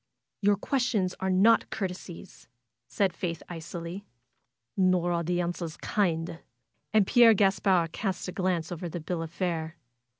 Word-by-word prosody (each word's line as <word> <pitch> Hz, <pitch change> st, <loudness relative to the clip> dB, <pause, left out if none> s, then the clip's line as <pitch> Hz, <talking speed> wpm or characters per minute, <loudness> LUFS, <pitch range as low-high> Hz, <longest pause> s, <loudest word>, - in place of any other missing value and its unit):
^^Your 205 Hz, 0 st, +3 dB
questions 235 Hz, -8 st, 0 dB
are 190 Hz, 0 st, -1 dB
not 200 Hz, +5 st, +4 dB
courtesies," 185 Hz, -3 st, -6 dB, 0.4 s
said 195 Hz, -3 st, 0 dB
Faith, 170 Hz, -2 st, -4 dB
icily. 170 Hz, +2 st, -7 dB, 0.7 s
''Nor 185 Hz, -2 st, +2 dB
are 170 Hz, -, 0 dB
the 175 Hz, +1 st, 0 dB
answers 170 Hz, -2 st, -4 dB
kind 165 Hz, -5 st, -1 dB, 0.3 s
!" -, -, -50 dB
And 215 Hz, -3 st, +4 dB
Pierre 230 Hz, +1 st, +6 dB
Gaspard 190 Hz, -4 st, +2 dB
cast 190 Hz, -2 st, -3 dB
a -, -, -3 dB
glance 180 Hz, -3 st, -1 dB
over 175 Hz, 0 st, -4 dB
the 175 Hz, -, -5 dB
bill 165 Hz, +1 st, -3 dB
of 165 Hz, -, -5 dB
fare. 170 Hz, -2 st, -3 dB
180 Hz, 145 wpm, -28 LUFS, 170-195 Hz, 0.7 s, Pierre